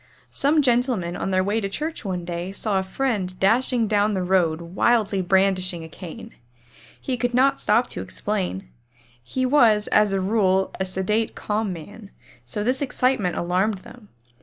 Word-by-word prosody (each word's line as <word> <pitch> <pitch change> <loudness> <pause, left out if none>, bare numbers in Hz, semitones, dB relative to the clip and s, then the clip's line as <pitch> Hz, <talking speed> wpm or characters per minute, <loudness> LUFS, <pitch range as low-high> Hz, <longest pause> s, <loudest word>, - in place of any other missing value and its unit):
Some 295 +2 +3
gentlemen 240 -8 +1
on - - -3
their 185 -1 +2
way 210 +3 0
to 195 - -2
church 310 +10 -4
one 180 -4 -3
day 175 +2 -4
saw 200 0 -1
a - - -2
friend 190 -3 -2
dashing 235 +3 +2
down 210 0 +2
the 185 - -1
road 175 -3 +2
wildly 195 +3 +1
brandishing 185 -2 +1
a - - -8
cane. 185 +7 -10 0.7
He 260 - -2
could 245 0 -1
not 270 +2 +3
stop 230 +4 +3
to - - -5
explain. 190 - -3 0.6
He 255 - -2
was 230 -6 +4
as 210 -1 +4
a 195 - 0
rule 190 -1 +1
a 190 - 0
sedate, 190 +4 -1
calm 210 -1 -2
man, 195 +5 -10 0.3
so 120 +13 -4
this 255 +4 +1
excitement 255 -8 0
alarmed 185 +4 0
them. 230 -5 -14
205 Hz, 165 wpm, -23 LUFS, 185-235 Hz, 0.7 s, was